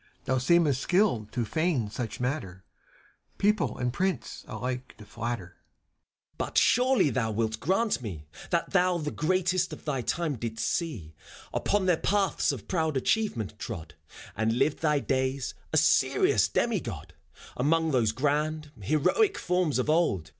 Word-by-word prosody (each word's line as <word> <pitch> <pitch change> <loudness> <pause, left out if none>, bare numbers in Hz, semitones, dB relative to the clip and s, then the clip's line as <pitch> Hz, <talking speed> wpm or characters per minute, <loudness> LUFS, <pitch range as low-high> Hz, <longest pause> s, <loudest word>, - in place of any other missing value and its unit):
CHIRON. - - -34
Thou 130 - +1
seemest 145 -1 +3
skilled 180 - +1
to 120 -2 -1
feign 155 -6 0
such 115 0 -5
matter 110 -8 -3 0.4
— - - -35
People 205 - +1
and 125 -1 -1
Prince 190 +4 -2
alike 125 0 -5
to 105 - -12
flatter. 115 -5 -4
FAUST. 85 - -38
But - - -2
surely 250 - +4
thou 115 -2 0
wilt 110 0 -1
grant 195 - +1
to - - 0
me 85 -9 -6 0.2
That 170 -1 0
thou 180 -2 +3
the 150 -3 -3
greatest 185 +2 +1
of - - -10
thy 140 -4 -1
time 155 +2 -1
didst 115 -1 -3
see. 115 - -3 0.4
Upon 205 -2 +1
their 180 -3 +3
paths 195 -4 +1
of 125 -8 -7
proud 160 -5 0
achievement 125 - -1
trod. 80 -9 -6 0.4
And 110 +2 0
lived 140 +3 +1
thy 150 -3 +2
days, 130 -1 -1 0.2
a - - +2
serious - - +3
demigod. - - -2 0.4
Among 160 +5 +2
.those 120 -5 +2
grand, 150 +4 -1
heroic 380 - +2
forms 180 -5 0
of 130 - 0
old. 150 - +1
140 Hz, 155 wpm, -28 LUFS, 115-170 Hz, 0.4 s, surely